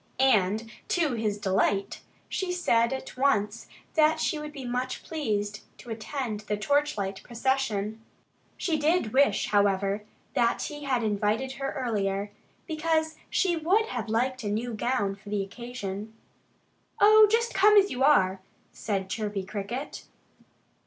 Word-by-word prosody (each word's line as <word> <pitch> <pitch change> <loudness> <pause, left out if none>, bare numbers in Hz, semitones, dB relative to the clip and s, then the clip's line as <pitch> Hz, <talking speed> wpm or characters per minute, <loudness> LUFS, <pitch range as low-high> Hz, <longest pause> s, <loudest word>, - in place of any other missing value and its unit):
And 220 -4 +2 0.2
to 320 -6 +1
his 215 -3 -1
delight, 195 0 0 0.3
she 375 -2 -2
said 235 -10 +2
at 265 0 -5
once 235 -5 +1 0.3
that 315 0 +4
she 315 - 0
would 300 0 -6
be 275 -3 -8
much 250 +1 -3
pleased 210 -9 -2 0.2
to 240 - -10
attend 225 0 -4
the 210 0 -3
torchlight 210 -6 0
procession. 230 -4 -1 0.6
She 320 -4 0
did 300 -6 +1
wish, 270 -6 +3
however, 200 0 +2 0.3
that 235 0 +1
he 295 -1 -6
had 255 -4 +1
invited 215 +5 0
her 275 0 -4
earlier, 205 -5 -1 0.3
because 315 -1 0
she 365 -3 +2
would 375 +8 +2
have 235 -3 -4
liked 255 +3 0
a - - -3
new 230 +3 -2
gown 215 -3 -1
for 205 +1 -13
the 205 -1 0
occasion. 215 -1 -7 0.8
"Oh, 430 +1 +8 0.3
come 420 +2 +5
just 405 - +8
as - - -8
you 255 +1 -1
are!" 190 -10 +4 0.3
said 195 -3 -2
Chirpy 205 -1 -3
Cricket. 210 +8 -5
235 Hz, 140 wpm, -27 LUFS, 205-285 Hz, 0.8 s, Oh